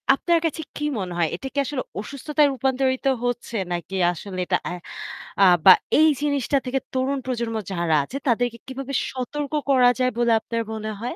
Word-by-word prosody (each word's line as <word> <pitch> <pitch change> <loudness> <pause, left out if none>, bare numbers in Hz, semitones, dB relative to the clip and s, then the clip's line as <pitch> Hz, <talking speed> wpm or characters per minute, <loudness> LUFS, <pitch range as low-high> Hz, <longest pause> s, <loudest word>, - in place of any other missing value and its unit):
আপনার 340 +4 +2
কাছে 320 0 -1
কি 295 - -3
মনে 180 -2 -4
হয়? 170 - +2
এটা 270 - -6
কি - - -10
আসলে 265 -2 -3 0.2
অসুস্থতায় 290 +5 +1
রূপান্তরিত 260 +1 0 0.2
হচ্ছে 245 -1 -3 0.2
নাকি 175 +2 -5 0.2
আসলে 185 +2 -7
এটা - - +2
এ - - -5 0.7
আ - - +8 0.2
বা 190 - +11 0.3
এই 315 - +7
জিনিসটা 285 -2 +1
থেকে 260 +1 0
তরুণ 265 +2 0
প্রজন্ম 235 -3 -2 0.2
যারা 170 -3 +1
আছে 255 - -6
তাদেরকে 240 0 +1
কিভাবে 270 +1 -6 0.2
সতর্ক 280 +3 -4 0.2
করা 255 -2 +6
যায় 255 0 +2
বলে 240 -1 +2
আপনার 230 +1 -3
মনে 215 0 -4
হয়? 245 +7 -4
255 Hz, 180 wpm, -23 LUFS, 225-275 Hz, 0.7 s, বা